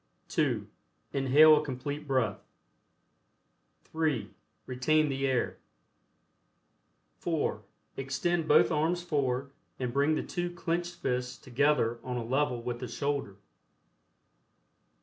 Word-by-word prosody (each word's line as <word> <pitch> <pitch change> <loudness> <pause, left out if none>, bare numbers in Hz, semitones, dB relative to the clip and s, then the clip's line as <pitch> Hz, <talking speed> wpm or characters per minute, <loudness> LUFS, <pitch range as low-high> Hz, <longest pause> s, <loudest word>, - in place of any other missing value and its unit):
(2) - - 0 0.5
Inhale 145 +3 +7
a 150 - 0
Complete 145 +2 -5
Breath. 125 -7 0 1.4
(3) 150 -10 -1 0.3
Retain 150 +4 +2
the 135 0 0
air. 130 -2 0 1.6
(4) - - -1 0.4
Extend 145 +5 -1
both - - +5
arms 165 +3 +1
forward 140 -4 -1 0.3
and 125 -2 -3
bring 140 +3 +3
the - - -1
two 175 -1 -3
clenched 175 0 -2
fists 125 -6 -2
together 130 -3 +1
on 125 -1 -3
a 120 - -3
level 125 -1 0
with 120 0 -3
the 125 - -5
shoulder. 120 -3 -2
140 Hz, 110 wpm, -30 LUFS, 125-155 Hz, 1.6 s, Inhale